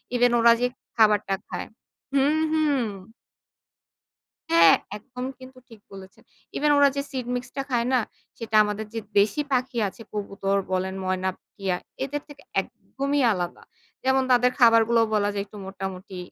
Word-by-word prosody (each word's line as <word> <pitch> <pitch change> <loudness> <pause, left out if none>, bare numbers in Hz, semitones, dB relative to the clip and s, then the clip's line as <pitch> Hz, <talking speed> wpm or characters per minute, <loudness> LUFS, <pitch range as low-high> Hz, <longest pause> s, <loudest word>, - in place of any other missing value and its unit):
Even 245 0 +4
ওরা 235 0 +7
যে 250 - +3 0.3
খাবারটা 210 -3 +3
খায় - - -5 0.5
হুম, 295 +3 +3
হুম। 295 -4 +2 1.7
হ্যাঁ, 330 -5 +7 0.2
একদম 250 +3 -8
কিন্তু 255 0 -13
ঠিক 225 -3 -14
বলেছেন। 190 -1 -12 0.3
ইভেন 295 0 +2
ওরা 285 0 +6
যে 280 - 0
সিড 260 -3 -4
মিক্স 245 - -5
টা - - +1
খায় 240 -1 +1
না? 255 - +5 0.4
সেটা 225 -1 -4
আমাদের 210 +1 -3
যে 225 - -2 0.2
দেশী 210 +8 +2
পাখি 250 -1 0
আছে 200 +4 -10
কবুতর 200 -1 -2
বলেন 190 +1 -1
ময়না, 185 0 0 0.3
টিয়া 190 -3 -1 0.3
এদের 285 +2 -3
থেকে 290 -1 -14 0.2
একদমই 280 +1 -3
আলাদা। 175 -2 -4 0.4
যেমন 265 0 +3
তাদের 250 0 +4
খাবারগুলোও 230 -1 +5
বলা 205 0 +2
যায় 200 -1 -2
একটু 205 +1 -13
মোটামুটি 190 0 -7
230 Hz, 150 wpm, -25 LUFS, 200-265 Hz, 1.7 s, ওরা